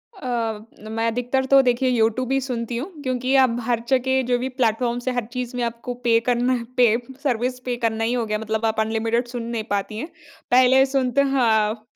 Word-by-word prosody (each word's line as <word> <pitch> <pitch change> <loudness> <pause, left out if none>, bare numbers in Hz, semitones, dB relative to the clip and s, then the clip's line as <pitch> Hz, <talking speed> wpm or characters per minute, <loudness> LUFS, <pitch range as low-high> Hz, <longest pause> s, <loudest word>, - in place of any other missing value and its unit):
अ, 235 - -3 0.3
मैं 225 +1 -2
अधिकतर 245 +3 0
तो 275 +1 +6
देखिए 255 0 +1
यूट्यूब 240 +1 +1
ही 270 - +2
सुनती 240 -2 -3
हूँ, 295 +11 -5
क्योंकि 255 0 0
अब 240 -2 0
हर 235 0 0
जगह 265 0 +2
जो 245 - +3
भी 255 +2 -2
प्लेटफ़ॉर्म्स 240 0 -1
हैं 255 - 0
हर 245 -3 -1
चीज़ 250 -1 -4
में 245 - -1
आपको 235 +1 -4
पे 230 -1 +4
करना 245 +1 +2
है 240 -2 -2
पे 240 -3 +5 0.3
सर्विस 250 -1 -1
पे 250 -1 -1
करना 225 0 0
ही 230 +2 0
हो 240 -2 0
गया 215 -1 -1
मतलब 220 +1 -2
आप 220 0 0
अनलिमिटेड 225 +2 0
सुन 240 -1 -5
नहीं 220 - -2
पाती 205 +1 -2
हैं। 300 - -4 0.4
पहले 255 +1 +6
सुनते 265 -1 +1
हाँ, 225 -5 +1
245 Hz, 205 wpm, -22 LUFS, 225-255 Hz, 0.4 s, तो